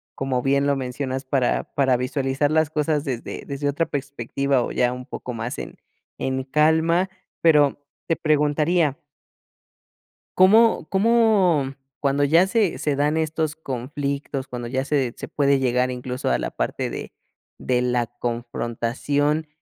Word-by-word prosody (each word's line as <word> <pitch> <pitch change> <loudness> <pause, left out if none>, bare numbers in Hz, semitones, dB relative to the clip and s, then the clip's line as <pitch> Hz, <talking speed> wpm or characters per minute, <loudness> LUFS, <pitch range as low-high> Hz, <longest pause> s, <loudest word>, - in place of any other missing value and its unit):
como 130 -2 -1
bien 140 +2 +2
lo 140 - +2
mencionas, 130 +1 -4
para 130 -2 +1
para 135 -3 +3
visualizar 135 +2 0
las 155 -1 +2
cosas 150 -1 0
desde 130 -6 -5
desde 140 0 -3
otra 145 +4 0
perspectiva 140 -2 -1
o - - -4
ya 125 0 +1
un 125 0 -8
poco 125 - -6
más 115 +1 -4
en - - -7 0.4
en 130 0 -2
calma. 160 +5 +2 0.3
Pero, 150 -4 +4 0.3
te 165 - +2
preguntaría 150 0 +2 1.4
¿cómo? 215 -1 +5
¿cómo? 195 - +3 0.2
Cuando 140 0 +1
ya 165 +6 +4
se 205 -3 +1
se 145 -2 0
dan 145 +2 +2
estos 160 -1 -1
conflictos, 140 0 -4
cuando 120 -2 -6
ya 130 +2 -1
se 135 -4 0
se - - -7
puede 140 -1 +2
llegar 125 -1 +1
incluso 125 0 -3
a - - +2
la - - -2
parte - - -2
de - - -7 0.5
de 125 -1 0
la 125 -1 0
confrontación, 120 +5 -2
140 Hz, 145 wpm, -23 LUFS, 125-155 Hz, 1.4 s, cómo